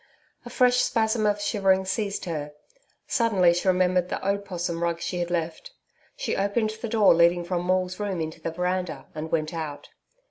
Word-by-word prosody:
A - - -7
fresh 250 -1 +3
spasm 220 -3 +1
of 205 0 +1
shivering 195 -2 +2
seized 200 +1 -2
her. 150 -4 -4 0.5
Suddenly 205 -9 +3
she 175 +2 -2
remembered 180 -1 +2
the - - -3
opossum 180 -4 -2
rug 170 -1 0
she 175 +1 -3
had 175 0 -2
left. 175 - -3 0.4
She - - -2
opened 210 +3 0
the 220 +1 -6
door 215 -5 +5
leading 170 +1 +4
from 175 0 -2
Maule's 185 +1 0
room 200 -4 -2
into 160 0 -5
the 165 - -2
veranda, 180 -4 -2
and 155 +1 -6
went 155 0 -1
out. 155 -3 -6
185 Hz, 175 wpm, -25 LUFS, 170-205 Hz, 0.5 s, door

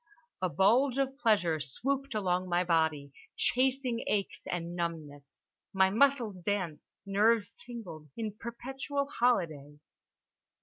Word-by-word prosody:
A 185 - +1
bulge 245 +9 +3
of 270 -1 0
pleasure 205 - +2
swooped 270 - -2
along 185 -3 0
my 175 +1 +2
body, 160 -5 +1 0.2
chasing 255 -2 +1
aches 200 -2 -2
and 170 -1 -3
numbness, 155 -5 -5 0.3
my 190 0 +4
muscles 235 -5 +2
danced, 175 -5 -3
nerves 210 +2 +2
tingled 185 -11 -9
in 215 -3 -3
perpetual 265 +5 -4
holiday. 165 - 0
200 Hz, 115 wpm, -31 LUFS, 170-245 Hz, 0.3 s, my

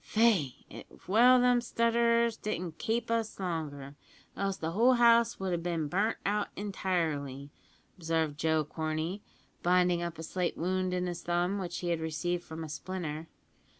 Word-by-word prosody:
"Faix, 210 - +3
it's - - -13
well 245 +6 +6
them 245 -1 +4
stutterers 235 0 +2
didn't 180 -7 -4
kape 230 +1 -1
us 230 -3 -1
longer, 150 -6 -4 0.4
else 195 -1 -1
the 160 -2 -3
whole 235 +8 +4
house 235 -1 +4
would 190 -1 -2
have 170 -1 -1
bin 165 -3 -1
burnt 200 +8 0
out 205 +1 +1
intirely," 160 -9 -2 0.5
observed 160 -3 -1
Joe 160 -1 +2
Corney, 160 +5 -3 0.4
binding 180 -1 +3
up 170 -2 -4
a 160 - -6
slight 180 +2 -2
wound 185 +1 0
in 180 0 -1
his 175 -1 -4
thumb, 175 +3 0
which 175 -2 -4
he 175 - -2
had 170 -1 0
received 165 +2 -2
from 160 0 -7
a - - -5
splinter. 160 -1 -5
180 Hz, 160 wpm, -30 LUFS, 160-210 Hz, 0.5 s, well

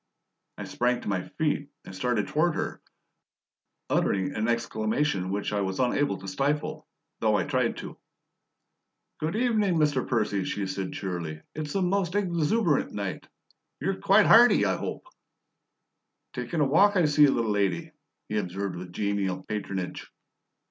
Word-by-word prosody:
I - - -5
sprang 125 0 0
to - - -8
my 95 -3 -1
feet 150 -2 0 0.2
and - - -9
started 110 +1 0
toward 155 +2 +1
her, - - -3 1.1
uttering 95 -1 +1
an 110 +1 -1
exclamation 110 -2 0
which 100 +2 -2
I 100 - +1
was 95 -1 -2
unable 125 -4 +1
to 95 - -8
stifle, 140 +10 -2 0.3
though - - +2
I - - +2
tried - - 0
to. - - -8 1.2
"Good 155 +4 -2
evening, 220 -6 +2
Mr. 150 -5 +1
Percy," 105 -5 0
she 100 - -2
said 95 0 -4
cheerily. 85 -5 -5
"It's 150 -1 -5
the 195 - +1
most 185 0 0
EXUBERANT 175 -2 +1
night. 100 -2 -4 0.5
YOU'RE 195 0 -2
quite 200 +1 +5
hearty, 240 +2 +7
I - - +1
hope?" - - -5 1.3
"Takin' 165 -3 -2
a - - +4
walk, 200 +9 +4
I 180 -4 +4
see, 150 0 +6
little 115 -5 +1
lady," 105 - 0 0.4
he 105 - -1
observed 95 0 -4
with 90 0 -8
genial 100 -2 -1
patronage. 100 -3 -5
120 Hz, 150 wpm, -27 LUFS, 100-160 Hz, 1.3 s, hearty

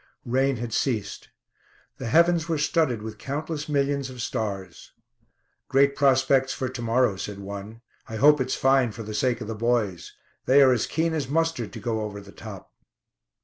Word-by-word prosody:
Rain 135 +3 +1
had 120 -1 -5
ceased. 115 -7 -2 0.7
The 130 - -4
heavens 170 +5 +3
were 165 - +1
studded 145 -6 +1
with 110 -1 -7
countless 150 +2 -4
millions 140 -1 0
of 125 -1 -10
stars. 100 -6 -4 0.7
"Great 140 +1 +3
prospects 135 -1 +3
for 130 - -3
to 130 -1 -7
morrow," 115 -3 +2
said 100 +1 -5
one. 100 +3 -8 0.3
"I 110 - -5
hope 145 +4 +5
it's 130 0 -1
fine, 135 -4 +3
for 115 - -7
the 110 0 -7
sake 120 +2 0
of 105 - -5
the 115 - -3
boys. 110 -6 -1 0.3
They 140 +2 +7
are 130 - +6
as 120 -3 +1
keen 165 +1 0
as 145 -5 -2
mustard 165 -6 0
to - - -7
go 115 -2 -2
over 105 -1 -5
the 100 0 -13
top." - - -11
125 Hz, 180 wpm, -25 LUFS, 110-140 Hz, 0.7 s, They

